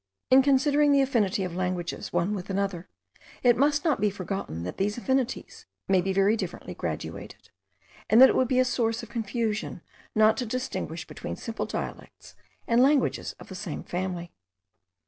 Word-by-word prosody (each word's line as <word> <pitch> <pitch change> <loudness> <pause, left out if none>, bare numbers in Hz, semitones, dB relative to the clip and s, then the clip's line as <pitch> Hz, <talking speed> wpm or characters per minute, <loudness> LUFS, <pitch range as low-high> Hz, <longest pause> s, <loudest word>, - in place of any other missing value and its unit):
In 260 +1 +8
considering 285 +2 +3
the 280 -1 +5
affinity 215 -6 +1
of 180 -2 -4
languages 180 -1 -3
one 175 +4 0
with 190 -2 -5
another, 195 -3 -2 0.5
it 245 -2 +6
must 290 +3 +2
not 300 -10 +2
be 210 - +3
forgotten 185 - -5
that 90 - -5
these 205 +3 -1
affinities 265 - -2 0.2
may 190 -1 +4
be 190 +2 -1
very 195 +3 +3
differently - - -5
graduated; - - -6 0.6
and 220 - +6
that 265 - +10
it - - +1
would 260 - +3
be 255 - +1
a 255 - +5
source 230 -2 0
of - - -9
confusion 220 -4 -3 0.3
not 220 0 +5
to 250 - -2
distinguish 235 -9 -4
between - - -6
simple 225 -1 -4
dialects - - -7 0.3
and 235 +1 +4
languages 275 +1 +2
of - - -12
the - - -9
same 185 -4 -5
family. 180 -1 -4
220 Hz, 170 wpm, -27 LUFS, 190-260 Hz, 0.6 s, that